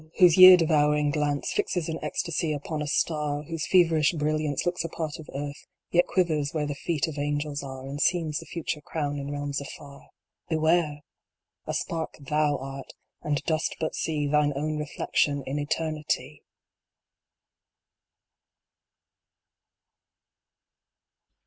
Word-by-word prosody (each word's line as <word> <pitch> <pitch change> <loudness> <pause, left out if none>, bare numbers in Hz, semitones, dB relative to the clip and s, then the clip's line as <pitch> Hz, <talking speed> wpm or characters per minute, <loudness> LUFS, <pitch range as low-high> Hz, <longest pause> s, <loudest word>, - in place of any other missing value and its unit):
whose 175 -3 +7
year 185 0 +11
devouring 150 -3 +2
glance 145 -1 -1
Fixes 175 -4 -1
in 160 -1 -4
ecstasy 165 -1 -1
upon 150 +1 -4
a 150 - -3
star, 150 -1 0
Whose 165 0 -4
feverish 165 -4 +4
brilliance 155 -2 -1
looks 175 0 -1
a 165 - -4
part 155 -2 -4
of 160 - -11
earth, 145 +1 -6 0.2
Yet 175 0 +4
quivers 155 -5 0
where 150 -1 0
the 145 - -3
feet 145 -1 -1
of 150 -2 -5
angels 145 0 -2
are, 135 -1 -8
And 140 +2 -4
seems 160 -4 +1
the - - -11
future 160 -3 -4
crown 145 -1 -3
in 140 0 -5
realms 145 -1 -3
afar 140 0 -11 0.4
Beware! 160 -2 +1 0.7
A - - -2
spark 165 -1 -3
thou 150 +1 +1
art, 135 0 -8 0.3
and 145 -2 -1
dost 160 +1 -1
but 160 - -2
see 155 -3 -1
Thine 145 0 +2
own 150 +2 -2
reflection 145 -1 0
in 140 +2 -2
Eternity 155 +1 -2
150 Hz, 135 wpm, -27 LUFS, 145-160 Hz, 0.7 s, year